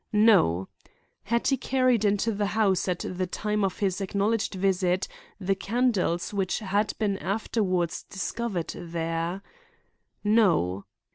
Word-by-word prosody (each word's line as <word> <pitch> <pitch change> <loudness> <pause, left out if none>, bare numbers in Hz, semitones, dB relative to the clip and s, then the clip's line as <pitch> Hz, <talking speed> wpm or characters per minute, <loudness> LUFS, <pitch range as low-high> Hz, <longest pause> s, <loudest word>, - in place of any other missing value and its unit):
No. 195 - +4 0.6
Had 235 +3 0
he 270 - +2
carried 255 -5 +2
into 205 +2 +2
the 205 -1 -1
house, 195 -4 +2
at 180 -1 -1
the 185 0 -2
time 210 +3 -1
of 195 - -1
his 195 -1 -1
acknowledged 200 +2 0
visit, 185 -1 +1 0.3
the 195 0 +1
candles 200 -4 0
which 195 -2 0
had 205 0 0
been 200 -3 0
afterward 190 -3 0 0.2
discovered 190 -2 -3
there? 165 +2 -3 0.8
No. 180 - +2
195 Hz, 125 wpm, -27 LUFS, 180-215 Hz, 0.8 s, No